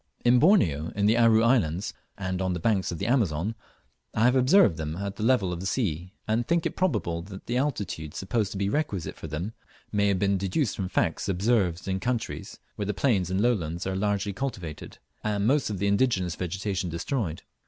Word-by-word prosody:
In 120 +1 +6
Borneo, 85 - +4
in 100 0 +1
the 110 +2 +4
Aru 115 -1 +5
Islands, 100 -8 +2 0.2
and 95 -1 -2
on 95 -1 0
the 90 - -3
banks 100 -1 +1
of 85 - -4
the 100 - -3
Amazon, 105 - +1 0.6
I 110 - +2
have 125 +2 +5
observed 130 - +5
them 80 -1 -3
at 100 +1 -4
the - - -8
level 110 -6 +2
of 85 - -5
the 95 - -3
sea, 95 - -2
and 115 +2 0
think 170 +1 +1
it - - -2
probable 85 - 0
that 95 +2 -10
the 120 - -1
altitude 100 - -2
supposed 105 +1 -1
to - - -5
be 100 0 0
requisite 100 - -2
for - - -8
them 80 +8 -4 0.4
may 100 0 +2
have 100 -2 +2
been 100 0 +1
deduced 100 - 0
from 95 -2 -3
facts 90 +2 0
observed 95 -3 +1
in 95 0 -1
countries 120 +3 -3 0.2
where 105 - -2
the 105 - -1
plains 100 -8 +1
and 95 +2 0
lowlands 90 -8 0
are 95 0 -1
largely 100 0 0
cultivated, 95 - -5 0.3
and 105 -1 0
most 135 +1 +2
of 105 - -3
the 100 - -1
indigenous 100 -4 +2
vegetation 95 +1 -2
destroyed. 85 - -3
100 Hz, 205 wpm, -27 LUFS, 90-115 Hz, 0.6 s, In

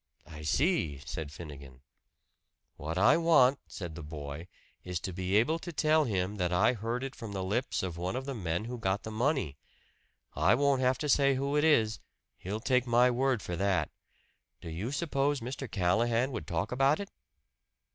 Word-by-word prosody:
"I 75 -1 -10
see," 80 - +1
said 80 -3 -5
Finnegan. 70 -5 -10 0.9
"What 80 +3 -5
I 105 - +5
want," 145 -5 +5
said 85 -4 -7
the 80 - -8
boy, 75 +1 -7 0.4
"is 90 -2 -3
to 95 - -4
be 95 +2 -1
able 140 +10 +3
to 175 - -7
tell 155 -1 +3
him 100 -2 -1
that 90 -2 0
I 105 +7 +3
heard 115 +3 -3
it 135 0 -5
from 110 -3 -7
the 95 -1 -3
lips 110 +6 -1
of 90 -3 -4
one 90 +5 -3
of 130 +1 -3
the 140 - -3
men 90 -3 -2
who 120 +1 -5
got 95 -1 -1
the 110 - -6
money. 120 - 0 0.8
I - - +4
won't 140 0 +2
have 130 0 +2
to 150 - -3
say 140 -1 +4
who 140 +2 -1
it 150 - +3
is 110 -10 +3 0.4
he'll 100 +4 -4
take 125 0 +2
my 120 +1 +4
word 130 -1 +1
for 90 - -4
that. 100 +1 +1 0.7
Do 85 - -8
you 100 +10 -4
suppose 145 -2 0
Mr. 130 +1 -6
Callahan 115 +7 +1
would 110 - -5
talk 85 +5 -2
about 135 +4 +3
it?" 200 0 -6
115 Hz, 185 wpm, -30 LUFS, 90-135 Hz, 0.9 s, I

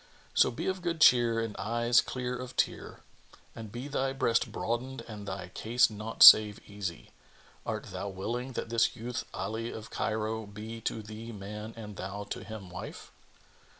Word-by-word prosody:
So - - +5
be 120 - -5
of 185 -1 -1
good 170 -2 -2
cheer 120 -5 +6
and 115 -2 -3
eyes 120 +3 +3
clear 125 -1 -4
of 125 0 -7
tear; - - -1 0.5
and 110 -2 -8
be 120 +4 -6
thy 135 -2 -1
breast 115 -4 +1
broadened 120 +2 -3
and 105 -3 -9
thy 95 -2 -5
case 120 +5 +2
naught 110 +2 +1
save 105 -2 +10
easy. 100 -4 -6 0.6
Art - - -4
thou 100 - -4
willing 120 +7 -4
that 115 - -4
this 115 +1 +2
youth 120 +1 -4
Ali 115 +1 -3
of 110 +1 -8
Cairo 110 0 -2
be 110 +3 -8
to 110 - -2
thee 110 +2 -8
man 105 +1 -7
and 105 -3 -8
thou 100 +2 -5
to - - -4
him 100 -3 -9
wife?" 90 - -8
115 Hz, 170 wpm, -30 LUFS, 105-120 Hz, 0.6 s, save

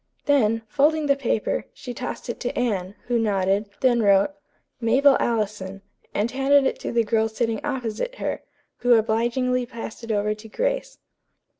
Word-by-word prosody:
Then, 225 -6 +3
folding 300 +5 +2
the 280 -1 +3
paper, 245 -5 -1
she 250 - -7
tossed 250 +2 -6
it 235 - -4
to 245 - -3
Anne, 200 -5 -1
who 240 -1 +1
nodded; 200 -1 +1
then 245 -3 +4
wrote, 200 -1 +4 0.5
"Mabel 265 +4 +5
Allison," 200 -4 -2 0.3
and 215 +3 -1
handed 275 +1 +4
it - - 0
to - - -4
the 235 -1 +2
girl 220 0 +1
sitting 225 -1 -2
opposite 265 - -3
her, - - -3 0.4
who 245 0 +4
obligingly 240 +3 +1
passed 230 0 -8
it 230 - -4
over 210 0 +1
to 215 +1 -12
Grace. - - -2
230 Hz, 160 wpm, -24 LUFS, 215-265 Hz, 0.5 s, Mabel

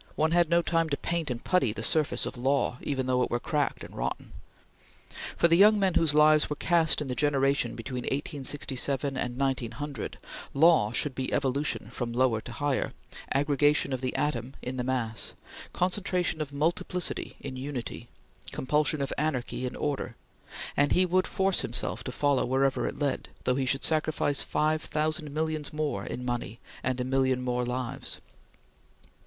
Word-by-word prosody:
One 160 +1 +2
had 170 -1 +4
no 170 0 +4
time 165 -1 +1
to 140 - 0
paint 170 -3 -2
and 120 -1 -4
putty 135 - +2
the 110 - -5
surface 155 +4 +3
of - - -5
Law, 130 0 0
even 135 -2 -2
though 125 0 +2
it - - +1
were 120 - 0
cracked 145 +2 -1
and - - -10
rotten. - - -3 1.1
For 170 - +5
the 165 - +4
young 210 +2 +7
men 190 -2 +2
whose 160 -3 +3
lives 150 0 +5
were 150 - -1
cast 165 0 +2
in - - -7
the 130 - -2
generation 140 -3 +1
between 125 +1 -5
1867 140 -1 -1
and 125 -1 -3
1900, 135 0 -3 0.4
Law 155 -8 +5
should 135 +3 0
be 130 0 -3
Evolution 140 +2 0
from 120 -2 -3
lower 120 -3 +2
to 120 - -8
higher, 145 +1 -1 0.4
aggregation 145 0 +2
of 130 - -2
the 130 -1 -2
atom 135 -3 -1
in 130 +1 -4
the 125 - -1
mass, 120 -3 -2 0.4
concentration 180 -3 0
of 145 -2 -4
multiplicity 165 +4 -1
in 135 -2 -6
unity, 130 -3 -5 0.4
compulsion 150 +2 +1
of 135 - -2
anarchy 130 -4 -1
in 125 - -6
order; 145 -2 -2 0.6
and 145 0 +3
he 185 - +5
would 185 +1 +2
force 195 -1 +1
himself 125 -2 -2
to 130 - -3
follow 140 0 +2
wherever 135 +2 +1
it - - -5
led, 140 -2 -1
though 125 - +2
he 130 0 -1
should 135 +2 +1
sacrifice 155 -2 +2
five 155 +1 +1
thousand 155 0 -2
millions 155 0 -2
more 150 -1 -2
in 125 - -5
money, 120 -2 -3 0.2
and 130 0 -1
a - - 0
million 130 0 +1
more 125 -1 -1
lives. 125 +1 -4
140 Hz, 170 wpm, -28 LUFS, 130-155 Hz, 1.1 s, young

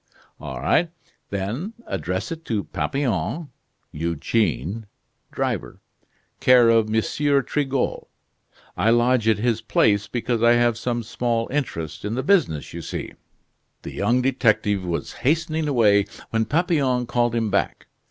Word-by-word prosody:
"All 65 -2 -6
right, 165 - +2 0.4
then. 110 - -3
Address 90 - -3
it 165 0 -6
to 105 -4 -1
Papillon 135 - -2 0.4
(Eugene), 85 - -1 0.4
driver, - - -3 0.6
care 125 -2 +6
of 115 -1 +3
M. 110 0 +2 0.4
Trigault. 135 -3 -1 0.7
I 110 - +2
lodge 120 0 +3
at 110 -2 +4
his 115 0 0
place, 105 -1 +2
because 120 -1 -2
I 120 0 +6
have 120 -1 +3
some 120 0 -2
small 115 0 -1
interest 100 - -3
in 105 +2 -2
the 130 - -2
business, 145 - +1
you 85 - -5
see." - - -6 0.7
The - - -7
young 120 +5 +1
detective 110 -6 +2
was 85 -5 -3
hastening 160 +2 +1
away, 105 -7 +4 0.2
when 115 0 +1
Papillon 145 -6 +1
called 120 0 0
him 115 -3 0
back. - - -1
115 Hz, 135 wpm, -23 LUFS, 100-130 Hz, 0.7 s, care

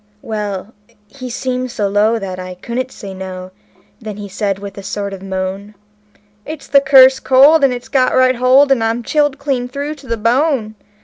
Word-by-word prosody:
Well, 210 -1 -5 0.4
he 255 -2 -9
seemed 255 +1 -3
so 210 -4 -2
low 210 +3 +2
that 190 -3 -6
I 185 0 -7
couldn't 245 +7 -5
say 200 -6 -9
no; 185 -1 -8 0.5
then 215 -3 -7
he 205 -1 -7
says 195 0 -2
with 200 -1 -9
a - - -7
sort 200 +1 -5
of 190 - -8
moan: 190 +2 -5 0.7
"It's 310 +2 -8
the 280 0 +4
cursed 265 -1 +6
cold, 280 +4 +5
and 275 - +4
it's 245 +1 -6
got 255 -2 +1
right 255 -1 +3
hold 260 +3 +4
till 270 -4 +2
I'm 225 +2 -1
chilled 290 +1 +1
clean 270 -3 -2
through 280 +4 -5
to 285 -3 -15
the 230 -1 -2
bone. 235 0 0
235 Hz, 190 wpm, -16 LUFS, 200-265 Hz, 0.7 s, cursed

